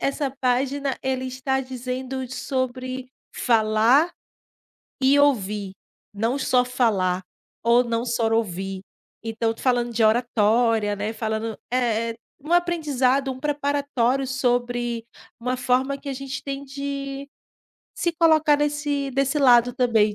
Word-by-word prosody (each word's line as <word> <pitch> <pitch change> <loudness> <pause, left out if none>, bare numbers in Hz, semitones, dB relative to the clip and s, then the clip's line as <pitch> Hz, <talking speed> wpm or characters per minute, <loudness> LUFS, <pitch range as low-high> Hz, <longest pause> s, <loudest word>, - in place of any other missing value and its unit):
essa 275 0 -1
página 270 +2 0
ele 260 -1 -2
está 265 +1 -1
dizendo 255 0 -5
sobre 255 0 -3 0.3
falar 230 +7 +3 0.9
e 275 +2 +5
ouvir, 210 -8 +1 0.4
não 230 +6 0
só 250 -2 +3
falar 205 -8 +1 0.4
ou 235 +1 +5
não 235 0 -2
só 230 -2 0
ouvir. 195 -3 -2 0.4
Então 225 0 -1
tô - - -13
falando 240 -2 +1
de 225 0 +3
oratória, 225 -1 +2
né, 205 +2 -3
falando 220 -1 -3
é 230 -2 +1
é - - -5 0.3
um 325 - -3
aprendizado, 280 -6 +2
um 255 - -9
preparatório 280 -3 0
sobre 245 -2 -1 0.3
uma 250 +2 -1
forma 255 +2 +1
que 280 - -10
a - - -2
gente 270 0 -6
tem 275 0 -5
de 275 0 -5 0.7
se 345 - -1
colocar 315 -3 +5
nesse 290 -1 -1
desse 275 +3 +1
lado 245 -2 +5
também 220 -4 +2
255 Hz, 130 wpm, -23 LUFS, 230-275 Hz, 0.9 s, e